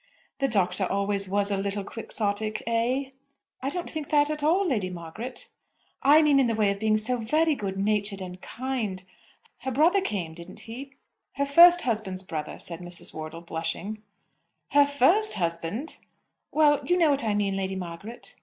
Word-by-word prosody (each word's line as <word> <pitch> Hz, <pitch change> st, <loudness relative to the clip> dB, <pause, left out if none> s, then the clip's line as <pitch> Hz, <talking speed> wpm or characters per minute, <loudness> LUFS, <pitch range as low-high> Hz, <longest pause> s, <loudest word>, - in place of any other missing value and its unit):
"The 275 Hz, -, +2 dB
Doctor 190 Hz, -4 st, +1 dB
always 200 Hz, 0 st, -1 dB
was 200 Hz, +1 st, +2 dB
a 200 Hz, -, +1 dB
little 200 Hz, +1 st, -2 dB
Quixotic 215 Hz, 0 st, -3 dB
eh?" 245 Hz, +4 st, 0 dB, 0.5 s
"I 265 Hz, -, -1 dB
don't 350 Hz, +4 st, -4 dB
think 310 Hz, -3 st, -5 dB
that 295 Hz, 0 st, +3 dB
at 300 Hz, -1 st, -3 dB
all, 345 Hz, +7 st, +3 dB
Lady 210 Hz, -, 0 dB
Margaret." 180 Hz, +9 st, -7 dB, 0.5 s
"I 300 Hz, +3 st, +6 dB
mean 290 Hz, -2 st, +5 dB
in 265 Hz, -, +3 dB
the 230 Hz, -, 0 dB
way 210 Hz, -2 st, +3 dB
of 200 Hz, -, -4 dB
being 215 Hz, 0 st, +2 dB
so 240 Hz, +4 st, 0 dB
very 305 Hz, +8 st, +2 dB
good 195 Hz, -7 st, -4 dB
natured 200 Hz, 0 st, 0 dB
and 180 Hz, -1 st, -7 dB
kind. 230 Hz, -7 st, -4 dB, 0.6 s
Her 265 Hz, -, -4 dB
brother 325 Hz, +10 st, +3 dB
came; 185 Hz, -, -3 dB
didn't 170 Hz, +1 st, -11 dB
he?" 265 Hz, +5 st, -9 dB, 0.4 s
"Her 280 Hz, -, 0 dB
first 345 Hz, +5 st, +8 dB
husband's 210 Hz, -6 st, -2 dB
brother," 155 Hz, -4 st, -5 dB
said 170 Hz, -1 st, -4 dB
Mrs. 175 Hz, -1 st, -5 dB
Wortle, 155 Hz, +1 st, -7 dB
blushing. 170 Hz, +6 st, -4 dB, 0.7 s
"Her 285 Hz, 0 st, +6 dB
first 330 Hz, -, +3 dB
husband!" 170 Hz, -, -2 dB, 0.5 s
"Well; 295 Hz, -2 st, +4 dB
you 355 Hz, -, +2 dB
know 330 Hz, -4 st, +4 dB
what 275 Hz, -3 st, +2 dB
I 215 Hz, -2 st, 0 dB
mean, 200 Hz, -2 st, 0 dB
Lady 190 Hz, 0 st, -2 dB
Margaret." 190 Hz, +6 st, -7 dB
215 Hz, 175 wpm, -26 LUFS, 190-280 Hz, 0.7 s, first